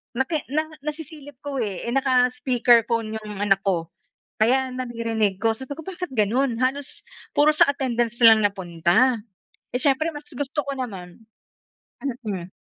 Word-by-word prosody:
naki 265 +5 0
na 310 +1 +2 0.2
nasisilip 300 -2 -7
ko, 285 -2 -3
eh. 200 -5 -3
Eh, - - -1
naka-speaker 250 -3 +3
phone 225 -2 -1
'yong 210 -2 -8
anak 195 -1 +3
ko 170 -4 0 0.5
kaya 260 +3 +2
naririnig 230 -5 -1
ko. 225 0 +3
Sabi 265 +4 -10
ko, 320 - -9
"Bakit 360 -4 -6
gano'n? 235 +4 +2
Halos 270 +2 -2 0.3
puro 295 +1 +5
sa - - +6
attendance 240 -4 -1
na 230 - +11
lang 220 - 0
napunta." 190 +6 +2 0.6
Eh, 250 - 0
siyempre 285 +3 +2
mas 295 0 -9
gusto 285 +3 -2
ko - - -6
naman 195 -7 -7 1.0
mm. 185 -4 -4
245 Hz, 150 wpm, -24 LUFS, 215-275 Hz, 1.0 s, na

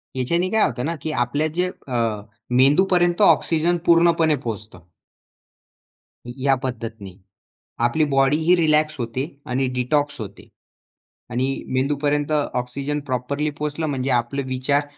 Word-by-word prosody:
याच्याने 170 +8 0
काय 220 +1 +2
होतं 125 +2 -2
ना, 165 +1 -2
की 155 - -3
आपल्या 145 +6 -1
जे 180 +1 +1 0.2
अ, 115 -4 -1 0.4
मेंदूपर्यंत 175 +6 +3
ऑक्सिजन 170 -3 +3
पूर्णपणे 165 -2 +4
पोहोचतो. 105 -6 -7 1.4
या 135 +2 0
पद्धतीने, 115 -6 -5 0.7
आपली 155 +6 +2
बॉडीही 150 +6 +4
रिलॅक्स 155 -1 +2
होते 120 +4 -2 0.3
आणि 130 +1 +1
डिटॉक्स 145 +2 0
होते 100 -2 -9 0.8
आणि 125 +2 0 0.3
मेंदूपर्यंत 145 +2 0
ऑक्सिजन 140 0 -2
प्रॉपरली 140 +4 -1
पोहोचलं, 150 +2 -4
म्हणजे 135 -2 -2
आपले 120 +3 0
विचार 130 +3 0
140 Hz, 115 wpm, -22 LUFS, 125-155 Hz, 1.4 s, पूर्णपणे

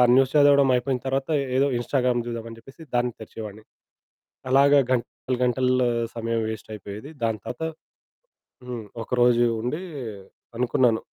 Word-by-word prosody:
News 135 0 +4
చదవడమయిపోయిన 135 -3 +4
తర్వాత, 135 +2 -1 0.3
ఏదో 140 +1 +4
Instagram 125 -1 +1
జూద్దామని 115 -1 -6
జెప్పేసి 135 +7 -14
దాన్ని 120 0 +1
తెరిచేవాడిని. 110 -1 -8 0.9
అలాగ 140 +2 +5 0.2
గంటలు 130 +1 -1
గంటల్ల 125 +1 +2 0.4
సమయం 115 0 -1
వేస్టయిపోయేది. 110 +4 -8
దాని 110 -1 0
తర్వాత 125 - -6 1.1
హ్మ్. 120 -3 -5 0.2
ఒక - - -12
రోజూ 120 0 +5
ఉండీ 150 +10 -3 0.8
అనుకున్నాను, 120 -2 +2
125 Hz, 115 wpm, -25 LUFS, 115-135 Hz, 1.1 s, అలాగ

